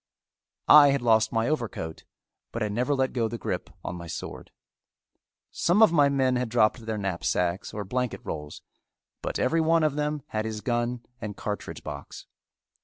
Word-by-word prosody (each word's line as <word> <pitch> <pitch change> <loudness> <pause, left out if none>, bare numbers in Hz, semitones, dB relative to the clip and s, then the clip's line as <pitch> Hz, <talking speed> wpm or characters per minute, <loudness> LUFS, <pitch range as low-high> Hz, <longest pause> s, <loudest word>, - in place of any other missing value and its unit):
I 150 -1 +9
had 140 -2 +1
lost 110 -2 +4
my 115 +1 +1
overcoat, 115 - -3 0.5
but 115 - -2
had 105 - -1
never 125 +7 0
let 130 -1 0
go 115 -3 +1
the 115 - -5
grip - - -4 0.2
on 90 - -4
my 85 -1 -8
sword. - - -7 1.0
Some 190 +6 +3
of 220 - +6
my 145 -4 +5
men 130 -2 +2
had 125 -1 -1
dropped 110 0 +2
their 110 -1 -2
knapsacks 90 -2 -1
or 105 -1 -5
blanket 125 +4 -2
rolls, 75 -1 -6 0.6
but - - -3
every 165 +6 +2
one 165 0 +3
of 155 -2 +2
them 150 -1 -2
had 110 0 -2
his 110 -1 -4
gun 120 0 -1 0.2
and 105 -2 -5
cartridge 105 -1 -5
box. 70 -2 -8
120 Hz, 175 wpm, -27 LUFS, 105-140 Hz, 1.0 s, I